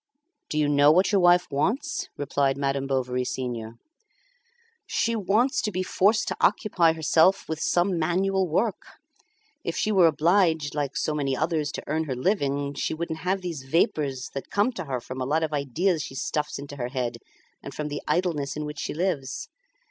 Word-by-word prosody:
"Do 155 - -2
you 150 -1 +3
know 145 0 +5
what 185 +6 +3
your 200 -2 +3
wife 175 0 +5
wants?" 225 - -1
replied 140 -1 0
Madame 140 -1 -1
Bovary 125 -2 0
senior. 120 -3 -4 1.1
"She 230 0 0
wants 220 +6 +2
to 210 - -2
be 185 0 -1
forced 205 +4 +2
to - - -4
occupy 180 -4 +3
herself 160 +4 +3
with 160 -1 -3
some 175 0 +1
manual 190 +3 +1
work. 195 +7 -2 0.7
If - - -3
she 215 - +1
were 185 -5 +6
obliged, 160 -1 +2
like 145 -2 -2
so 155 - 0
many 135 -3 -1
others, 155 -1 0
to - - -5
earn 160 +2 -1
her 135 -4 -3
living, 140 - 0
she 145 - -2
wouldn't 160 -1 -4
have 185 +4 -1
these 170 -6 -5
vapours, 135 -2 0
that 135 - -6
come 205 +5 +2
to 185 -8 -6
her 130 -3 -2
from 130 +2 -7
a - - -1
lot 160 +3 +1
of 155 -1 -2
ideas 155 +5 0
she 135 - -7
stuffs 150 +2 -2
into 140 0 -8
her 120 -2 -2
head, 125 -2 -3 0.4
and - - -8
from 150 0 -3
the 145 - -4
idleness 165 -6 0
in 150 - -3
which 150 0 -6
she - - -4
lives." 155 -6 -2
155 Hz, 185 wpm, -26 LUFS, 140-185 Hz, 1.1 s, were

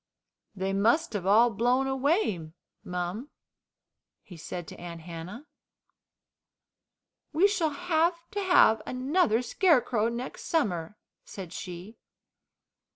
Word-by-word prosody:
"They 190 0 -2
must 230 +10 +2
have 190 -3 -3
all 230 +4 +5
blown 245 +5 +1
away, 265 - 0 0.3
mum," 180 +9 -4 0.9
he 180 - -12
said 170 +1 -7
to - - -11
Aunt 170 -1 -8
Hannah. 175 - -8 1.9
"We 345 +6 +5
shall 370 -6 0
have 335 +2 +1 0.2
to 405 - -2
have 360 - +5
another 255 - +1
scarecrow 245 - +2
next 240 +2 -6
summer," 205 - -1 0.3
said 185 -3 -9
she. 180 +4 -8
230 Hz, 105 wpm, -28 LUFS, 185-300 Hz, 1.9 s, all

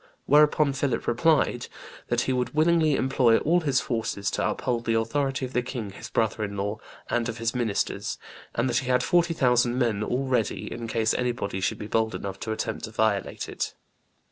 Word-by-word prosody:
Whereupon 150 -1 +4
Philip 135 -2 -1
replied 150 -3 +2 0.4
'that - - +1
he 130 - 0
would 125 +3 -2
willingly 155 -1 +4
employ 130 -4 +3
all 170 +4 +2
his 140 -5 +1
forces 110 -4 -2
to - - 0
uphold 120 -2 -2
the 115 - +1
authority 135 +4 0
of 130 - -9
the 125 - +2
king 120 -5 -5
his 100 - -9
brother 110 -1 0
in 100 -1 -4
law 100 +2 -2 0.3
and 120 -1 +1
of 115 - -5
his 115 0 -1
ministers, 115 -5 -1 0.4
and 120 +2 +1
that 120 -2 +1
he 130 - -5
had 125 -1 +3
forty 170 0 +2
thousand 125 -3 +3
men 115 -5 +1
all 125 +5 -1
ready 125 -4 -1
in 115 0 -5
case 115 -1 +1
anybody 120 -6 -2
should - - 0
be - - -6
bold 110 +1 0
enough 95 -1 -5
to 110 - -4
attempt 110 0 -3
to - - -9
violate 110 -3 0
it. - - -4
120 Hz, 195 wpm, -26 LUFS, 110-135 Hz, 0.4 s, Whereupon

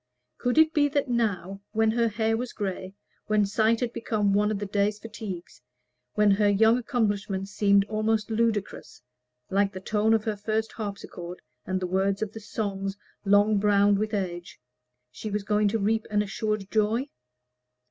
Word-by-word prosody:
Could 245 +2 0
it 315 0 +5
be 290 -1 +4
that 285 -2 0
now 200 -5 -1
when 220 0 +3
her 235 0 +2
hair 220 +1 0
was 245 +2 -4
gray, 190 -1 -4 0.3
when 215 -1 +3
sight 220 +3 +2
had 240 -2 -1
become 210 -3 0
one 205 +1 +3
of 215 - -1
the 205 - -4
day's 205 +1 0
fatigues, 205 - -8 0.5
when 210 -1 +4
her 205 +1 +3
young 220 +4 +4
accomplishments 205 -5 -1
seemed 200 -1 +3
almost 215 +1 -1
ludicrous, 220 - -2 0.5
like 195 +1 +2
the 185 - -6
tone 215 +3 +2
of 220 - 0
her 215 -1 -1
first 215 +2 -2
harpsichord 200 -4 -7 0.3
and 185 0 0
the 185 - -2
words 195 +3 0
of 210 - -4
the 220 - -7
song 200 -2 -3 0.3
long 205 +1 +4
browned 205 0 +4
with 215 0 -1
age 175 -3 -4 0.5
she 215 - -6
was 205 0 -2
going 210 0 +2
to 215 +3 +1
reap 220 +1 0
an 210 -1 +2
assured 210 -1 -3
joy? 220 +5 +1
210 Hz, 170 wpm, -26 LUFS, 200-220 Hz, 0.5 s, it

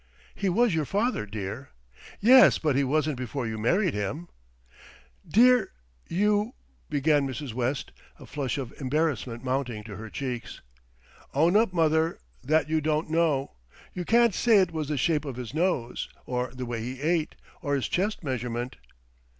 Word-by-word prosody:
"He 200 - -1
was 230 +3 +3
your 160 -2 0
father, 205 - -1
dear." 105 +6 -6 0.5
"Yes; 255 +5 +7
but 150 -4 0
he 140 - +3
wasn't 150 +1 0
before 125 +1 -3
you 110 -1 -4
married 180 - +2
him." 115 - -4 1.0
"Dear, 250 +3 +4 0.4
you 210 +5 +1 0.2
" - - -37
began 145 -1 +2
Mrs. 135 -2 -5
West, 125 +3 -2 0.3
a - - -12
flush 140 -3 -3
of 130 -3 -5
embarrassment 130 -5 -1
mounting 130 -4 -2
to 105 -1 -9
her 110 0 -8
cheeks. 125 -2 -5 0.8
"Own 165 +6 +3
up, 220 -1 +4
mother, 160 -1 +2 0.3
that 155 +4 +2
you 160 0 +1
don't 155 +1 -1
know. 160 -5 +1 0.4
You 180 - -4
can't 235 +3 +4
say 225 +3 +4
it 185 -3 +3
was 155 -3 -3
the 150 - -1
shape 150 +3 +1
of 135 -4 -5
his 125 0 -7
nose, 155 -8 -1 0.2
or 125 -1 -2
the 125 0 -6
way 120 -1 -4
he 125 +3 -5
ate, 160 +1 0 0.3
or 145 -2 0
his 135 - -1
chest 200 +2 -1
measurement." 125 -2 -3
145 Hz, 165 wpm, -27 LUFS, 125-170 Hz, 1.0 s, Yes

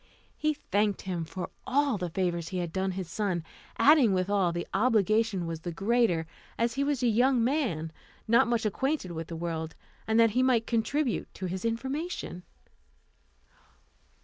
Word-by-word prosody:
He 305 0 0
thanked 205 -6 0
him 175 -3 -3
for 180 +3 -6 0.2
all 275 -4 +2
the 180 -1 -2
favours 170 -1 -1
he 185 - -4
had 175 -2 -3
done 190 0 -1
his 185 -2 -4
son; 180 -2 -2 0.3
adding 280 -8 +6
withal, 185 -1 +1
the 175 0 -3
obligation 215 -3 +2
was 165 -1 -4
the 175 +2 -5
greater, 195 -2 +1 0.3
as 235 0 +1
he 275 - 0
was 280 -3 0
a - - +4
young 245 +2 +3
man, 230 - 0 0.4
not 235 +3 +5
much 235 -2 0
acquainted 265 - -1
with 165 -1 -5
the 165 - -6
world, 160 -1 -4 0.3
and 220 +1 +3
that 230 -1 +5
he 250 +4 +2
might 250 -3 +3
contribute 245 +3 -1
to 190 - -5
his 185 +1 -4
information. 265 - -3
215 Hz, 165 wpm, -29 LUFS, 175-245 Hz, 0.4 s, adding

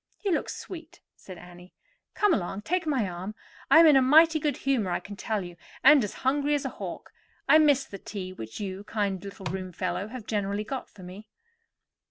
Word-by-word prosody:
"You 395 - +2
look 325 - 0
sweet," 340 -1 -9 0.2
said 185 -2 -12
Annie. 180 +1 -14 0.4
"Come 415 -3 +3
along, 195 - -2
take 355 +5 -1
my 260 -9 +1
arm. 185 +4 -6 0.3
I - - +7
am 330 - +9
in 305 -3 +7
a 270 - +6
mighty 315 +4 +6
good 295 -2 -1
humor, 265 -9 0
I 175 - 0
can 205 - -10
tell 210 0 -2
you, 175 -1 -10 0.3
and 280 -1 +7
as 205 - -3
hungry 290 +2 +2
as 285 - -3
a - - -1
hawk. - - -8 0.3
I 310 - +7
missed 290 -3 +3
the 195 - -7
tea 185 -3 -7
which 110 -10 -8
you, 190 -2 -4
you 200 - -10
kind 200 -4 -2
little 195 -1 -9
roomfellow, 185 +2 -3
have 235 -1 -9
generally 205 -1 -2
got 260 +3 -6
for 190 - -15
me." 190 +4 -10
210 Hz, 210 wpm, -27 LUFS, 190-290 Hz, 0.4 s, am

